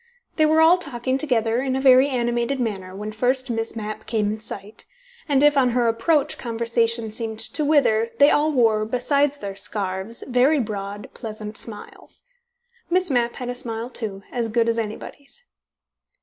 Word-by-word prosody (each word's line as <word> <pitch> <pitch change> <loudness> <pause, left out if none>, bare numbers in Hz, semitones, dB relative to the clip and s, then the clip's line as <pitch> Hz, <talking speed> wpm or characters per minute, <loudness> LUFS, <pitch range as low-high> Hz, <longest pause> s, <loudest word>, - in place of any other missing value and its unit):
They 310 -1 +4
were 315 +1 +4
all 335 +3 +6
talking 260 -3 -2
together 235 -5 +1
in 260 -1 -1
a - - 0
very 265 +1 +6
animated 240 +1 -1
manner 195 -6 -4
when 210 +2 -5
first 255 +3 0
Miss 225 0 -3
Mapp 215 -1 -6
came 215 -2 0
in 215 - -5
sight, 210 -1 -8 0.4
and 280 -1 +3
if, 295 0 +5
on 260 -3 +3
her 240 -1 +2
approach, 280 +6 +1
conversation 230 -1 -1
seemed 220 0 -2
to 245 +7 +2
wither, 240 -7 +2
they 285 +3 +6
all 300 +1 +2
wore, 225 -6 +2
besides 280 +5 0
their 200 -6 -6
scarves, 195 +2 -2
very 260 +4 +3
broad, 205 -3 -5
pleasant 215 -2 -7
smiles. 220 -2 -9 0.7
Miss 365 -2 +1
Mapp 240 -2 +1
had 250 -2 -5
a - - -2
smile, 235 -1 -4
too, 200 -5 -3
as 235 -2 -2
good 230 +1 +1
as 230 0 +1
anybody's. 280 - -8
235 Hz, 170 wpm, -22 LUFS, 220-270 Hz, 0.7 s, all